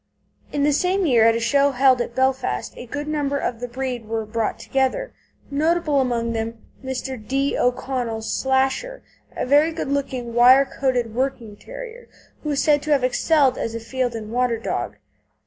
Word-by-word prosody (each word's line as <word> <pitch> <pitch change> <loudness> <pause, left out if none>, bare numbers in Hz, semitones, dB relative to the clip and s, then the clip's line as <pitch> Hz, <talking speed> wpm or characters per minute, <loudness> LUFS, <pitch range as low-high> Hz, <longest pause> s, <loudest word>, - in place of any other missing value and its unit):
In 285 - 0
the 295 0 +3
same 370 +5 +1
year 240 -7 +4
at 225 - +4
a - - 0
show 280 +5 +3
held 260 -1 +4
in - - -2
Belfast 260 - 0
a 245 - -9
goodly 290 +4 -4
number 285 -2 0
of 235 -4 -3
the 245 - -4
breed 250 -2 -4
were 225 0 -2
brought 220 +1 -2
together, 270 - -1 0.4
notable 305 -1 +2
among 235 -2 -1
them 225 0 -3 0.2
being 265 0 -4
Mr. 255 -4 -6
D. 275 +1 0
O'Connell's 245 -3 -1
Slasher, 265 - 0 0.3
a - - -1
very 290 +5 +4
good 320 -4 -4
looking 260 -4 -2
wire 255 +3 +7
coated 250 -4 -1
working 240 -4 -2
terrier, - - -10 0.3
who 300 - -4
is 285 -2 +1
said 295 -2 +3
to 305 - -3
have 280 -3 +3
excelled 275 +2 +2
as 230 - -3
a - - -3
field 245 +1 -2
and 215 -1 -6
water 245 -1 +1
dog. 120 - -3
260 Hz, 180 wpm, -22 LUFS, 235-285 Hz, 0.4 s, wire